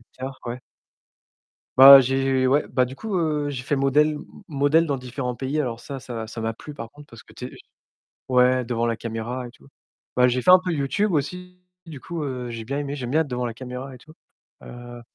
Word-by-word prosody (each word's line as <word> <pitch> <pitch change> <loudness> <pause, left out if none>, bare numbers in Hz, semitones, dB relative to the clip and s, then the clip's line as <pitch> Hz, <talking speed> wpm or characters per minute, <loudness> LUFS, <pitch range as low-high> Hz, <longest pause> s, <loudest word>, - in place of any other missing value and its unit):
acteur, 130 +3 -9
ouais. 120 +1 -4 1.2
Bah, 135 +1 +11
j'ai 135 0 +1
ouais, 145 +3 +2
bah, 130 - +1
du 125 +1 -5
coup, 220 -3 -4
heu, 150 -3 0
j'ai 125 -3 -5
fait 140 +2 -1
modèle 140 +3 +3
m 145 - -9 0.2
modèle 145 +3 +3
dans 140 -3 -1
différents 125 0 -5
pays. 135 +4 -2
Alors 120 -5 -2
ça 135 +1 -8
ça 115 -3 -6
ça 115 0 -7
m'a 115 0 -2
plu 150 +6 -11
par 115 -5 -8
contre, 145 0 -15
parce 115 -5 -14
que - - -19
tu - - -8
es - - -8 0.8
ouais 125 0 +4
devant 115 0 -2
la 115 - 0
caméra 115 +3 -5
et - - -13
tout. 125 - -21 0.5
Bah, 125 0 +5
j'ai 125 +1 0
fait 180 - +5
un 185 - +9
peu 180 - -2
YouTube 170 +8 0
aussi, 180 +4 -3 0.3
du 155 -5 -9
coup, 170 +1 -5
heu, 125 -3 -4
j'ai 115 -1 -6
bien 140 +5 -3
aimé, 145 0 -4
j'aime 125 -3 -5
bien 155 - +3
être 160 - -3
devant 125 -1 -3
la 115 - -4
caméra 130 +2 -8
et 125 - -11
tout, 155 +5 -17 0.5
heu 120 0 -10
130 Hz, 225 wpm, -23 LUFS, 125-145 Hz, 1.2 s, Bah